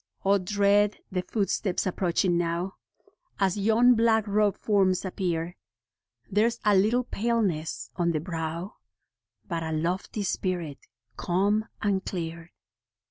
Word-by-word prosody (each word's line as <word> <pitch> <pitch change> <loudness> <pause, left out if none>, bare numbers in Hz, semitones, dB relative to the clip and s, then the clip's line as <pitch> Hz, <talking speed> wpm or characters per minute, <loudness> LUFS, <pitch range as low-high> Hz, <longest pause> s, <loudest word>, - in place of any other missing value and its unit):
O, 200 +1 +4
dread 205 +2 +2
the 185 -1 0
footsteps 195 -1 -1
approaching 180 -1 +1
now, 175 +2 -1 0.7
As 190 -2 +2
yon 225 +4 +4
black 225 -2 +3
robed 205 -1 +2
forms 195 -3 +2
appear: 175 -2 -2 0.7
There's 230 +4 +1
a 210 -1 +5
little 220 +6 +3
paleness 210 -9 -1
on 170 -1 +2
the 155 - 0
brow, 165 +2 -5 0.7
But 170 -3 -2
a 160 0 -3
lofty 175 +6 -2
spirit, 175 -6 -2 0.4
calm 200 +4 +1 0.2
and 200 -2 +1
clear. 165 -1 -5
190 Hz, 120 wpm, -27 LUFS, 170-210 Hz, 0.7 s, a